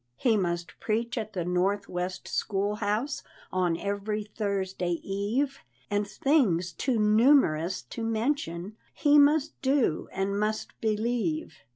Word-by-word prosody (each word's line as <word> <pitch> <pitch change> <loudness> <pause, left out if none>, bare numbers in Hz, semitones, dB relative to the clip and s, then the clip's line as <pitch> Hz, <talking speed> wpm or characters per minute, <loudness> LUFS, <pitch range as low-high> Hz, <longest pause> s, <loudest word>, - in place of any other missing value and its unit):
He 230 - +2
must 175 -3 -2
preach 230 +3 -1
at 220 -3 -4
the 180 -4 -2
north 190 +3 +1
west 180 0 -4
school 205 +1 -1
house 215 +7 -1 0.3
On 180 -3 +1
every 205 +2 -2
Thursday 195 -4 -2
eve, 225 +9 -1 0.3
And 205 0 +1
things 200 - +2
too 255 - 0
numerous 210 - +4
to 175 - -6
mention 220 - -2 0.2
He 295 -1 +5
must 295 +1 +3
do, 265 - +1
and 200 +1 -1
must 215 +1 -1
believe. 215 -6 -1
210 Hz, 130 wpm, -28 LUFS, 185-235 Hz, 0.3 s, He